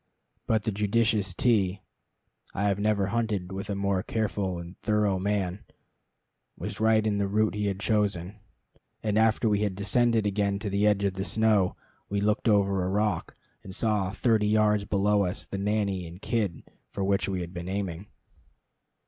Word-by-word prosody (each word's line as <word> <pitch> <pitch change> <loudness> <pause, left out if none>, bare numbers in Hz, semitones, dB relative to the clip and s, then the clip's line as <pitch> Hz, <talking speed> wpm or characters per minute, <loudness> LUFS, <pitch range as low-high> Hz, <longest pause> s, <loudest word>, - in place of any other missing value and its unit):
But 110 -2 +2
the 110 - -1
judicious 105 0 +1
T 100 -5 +2 0.8
(I 100 - -1
have 100 -1 +1
never 105 -1 +1
hunted 105 -6 -1
with 95 +1 -5
a 100 - -1
more 100 -1 0
careful 100 -5 -2
and 85 +2 -8
thorough 105 -3 +1
man) 100 -1 -1 0.9
was - - -6
right 110 0 +3
in 105 -2 +1
the 100 - +1
route 105 +2 +1
he 105 0 -1
had 100 -1 -2
chosen, 100 -2 0 0.6
and 105 -2 0
after 110 +1 +3
we 105 -2 +2
had 100 -3 -1
descended 115 +2 +2
again 100 -1 0
to 100 0 -4
the 100 +2 +2
edge 100 -1 +2
of 100 -1 +1
the 95 0 -3
snow, 105 -3 +2 0.3
we 100 - 0
looked 105 +2 +1
over 100 -2 +3
a 90 - -1
rock, 105 +2 -1 0.3
and 95 -1 -8
saw, 105 -4 0
thirty 110 -1 +2
yards 105 -1 +3
below 100 +1 +2
us, 90 -1 -3
the 100 - -5
nanny 100 -3 -1
and 85 +4 -12
kid 105 -8 -1 0.3
for 100 - -3
which 100 0 +1
we 95 -2 -2
had 85 +1 -7
been 90 0 -6
aiming. 95 -1 -4
100 Hz, 175 wpm, -27 LUFS, 95-105 Hz, 0.9 s, right